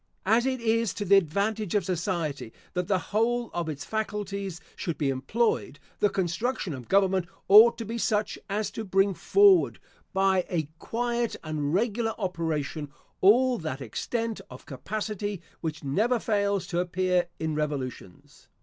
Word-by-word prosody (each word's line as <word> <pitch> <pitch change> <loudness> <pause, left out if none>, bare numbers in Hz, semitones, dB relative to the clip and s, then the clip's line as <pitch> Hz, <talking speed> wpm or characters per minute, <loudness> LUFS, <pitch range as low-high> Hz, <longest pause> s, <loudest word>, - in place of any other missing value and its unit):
As 225 +6 +3
it 260 -1 -1
is 230 -1 +1
to 205 - -3
the 200 +1 +6
advantage 200 +4 0
of 205 - +2
society 165 - -2 0.2
that 180 -1 -2
the 195 - +2 0.2
whole 235 +2 +1
of 170 -2 -2
its 145 -2 -5
faculties 200 -4 -3 0.2
should 170 -5 -3
be 140 -2 +1
employed, 145 - 0 0.2
the 205 - +4
construction 190 - -1
of 125 -3 -8
government 190 -2 +2 0.2
ought 225 +4 +8
to 230 - -5
be 230 +2 -4
such 210 -1 0
as 210 +2 -1
to 225 - -5
bring 195 0 +2
forward, 395 - +4 0.3
by 190 -1 +2
a 160 -5 -1
quiet 235 0 -1
and 150 -2 -2
regular 225 +2 0
operation, 160 -6 -2 0.3
all 245 +5 +5
that 155 -5 -4
extent 225 - -3
of 125 - -12
capacity 205 +6 -4 0.2
which 155 -3 -4
never 215 - +1
fails 200 -3 0
to 175 - -2
appear 180 0 +1
in 160 -1 -2
revolutions. 140 -11 -5
195 Hz, 150 wpm, -27 LUFS, 160-220 Hz, 0.3 s, ought